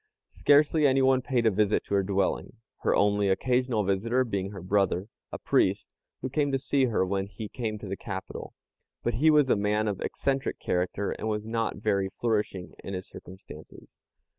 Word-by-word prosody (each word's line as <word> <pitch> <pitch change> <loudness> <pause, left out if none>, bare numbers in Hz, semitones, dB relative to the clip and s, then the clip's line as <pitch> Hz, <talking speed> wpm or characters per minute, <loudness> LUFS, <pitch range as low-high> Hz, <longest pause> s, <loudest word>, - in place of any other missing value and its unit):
Scarcely 150 +1 +4
anyone 130 -1 +3
paid 125 -2 0
a 110 - +5
visit 105 +1 +1
to - - -6
her 100 - +4
dwelling, 95 0 -1 0.3
her - - +1
only 100 0 +2
occasional 125 +2 +1
visitor 110 +7 +1
being 100 -5 -3
her 95 -3 -9
brother, 95 0 +1 0.2
a - - -4
priest, - - +1 0.3
who - - 0
came 145 0 +1
to 135 - +2
see 135 0 +1
her 110 -6 +1
when 95 +1 -2
he 105 +2 -7
came 110 -1 -4
to 105 -1 -9
the 95 - -3
capital, 95 -2 -7 0.5
but - - 0
he 145 +8 +3
was 150 -3 +5
a - - +4
man 105 +1 0
of 100 -3 -2
eccentric 135 -1 -1
character, 90 +3 -1
and - - -4
was 105 -1 -2
not 115 0 -1
very 100 -2 0
flourishing 105 -5 -2
in 100 - -5
his 95 - -6
circumstances. 95 +2 -13
105 Hz, 185 wpm, -28 LUFS, 100-130 Hz, 0.5 s, a